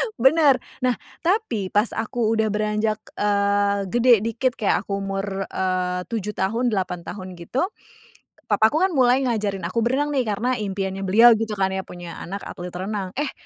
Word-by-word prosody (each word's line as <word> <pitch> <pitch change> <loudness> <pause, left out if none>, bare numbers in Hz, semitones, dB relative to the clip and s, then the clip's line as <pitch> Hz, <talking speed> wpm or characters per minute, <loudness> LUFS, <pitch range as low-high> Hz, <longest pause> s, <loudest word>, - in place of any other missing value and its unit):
bener, 275 +1 +4 0.2
nah 250 -1 +1 0.2
tapi 340 - 0
pas 210 +4 +1
aku 225 0 -1
udah 220 -1 +2
beranjak, 215 0 -1 0.2
eee, 200 0 +2
gede 240 -3 +5
dikit 235 +3 0
kayak 210 - 0
aku 200 - -1
umur, 195 0 -3
eee, 185 -1 -1
7 210 -3 -3
tahun, 225 +6 0
8 180 -3 -2
tahun 185 -1 -7
gitu, 170 +10 -4 0.9
papa 220 - +4
aku 315 +9 +1
kan 380 - +1
mulai 260 -1 +3
ngajarin 205 -6 -1
aku 185 +7 -1
berenang 270 +6 0
nih 255 -5 0
karena 235 +4 -1
impiannya 195 -1 -3
beliau 230 +5 +8
gitu 220 -2 -2
kan 190 -1 +1
ya 190 - -1
punya 175 -1 -9
anak 195 +3 -6
atlet 180 -2 -7
renang. 190 0 -4
Eh, 290 +1 -1
210 Hz, 170 wpm, -23 LUFS, 195-240 Hz, 0.9 s, beliau